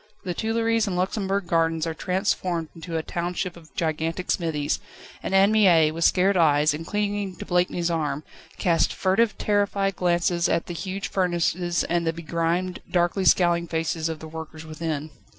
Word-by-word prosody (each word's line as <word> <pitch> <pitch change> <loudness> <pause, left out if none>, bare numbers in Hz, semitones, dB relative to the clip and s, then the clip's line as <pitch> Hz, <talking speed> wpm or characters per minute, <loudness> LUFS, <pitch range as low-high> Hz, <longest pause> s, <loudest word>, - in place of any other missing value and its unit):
The 180 - -2
Tuileries 225 +2 +1
and 190 - -2
Luxembourg 195 +1 -1
Gardens 165 -1 +1
are 165 - -2
transformed 180 -2 -1
into 165 0 -5
a 160 - -2
township 175 +2 -3
of 165 -2 -15
gigantic 165 +2 -1
smithies; 155 -4 -1 0.4
and 195 - -2
Anne 195 +2 +6
Mie, 175 -8 +5
with 165 +1 -3
scared 190 +2 +4
eyes, 150 -3 +4
and 160 +2 -6
clinging 205 -2 -2
to - - -8
Blakeney's 175 -1 +1
arm, 150 -3 -1 0.3
cast 170 -2 +2
furtive, 205 +3 +1
terrified 200 -2 +1
glances 175 -1 +1
at 165 - +1
the 175 - -6
huge 190 +3 -4
furnaces 175 -1 0
and 170 0 0
the 165 - +1
begrimed, 170 +2 -1
darkly 175 +2 +1
scowling 170 -1 +4
faces 165 0 -1
of 160 - -4
the 160 - -9
workers 160 0 -8
within. 155 -1 -4
175 Hz, 165 wpm, -25 LUFS, 165-190 Hz, 0.4 s, Anne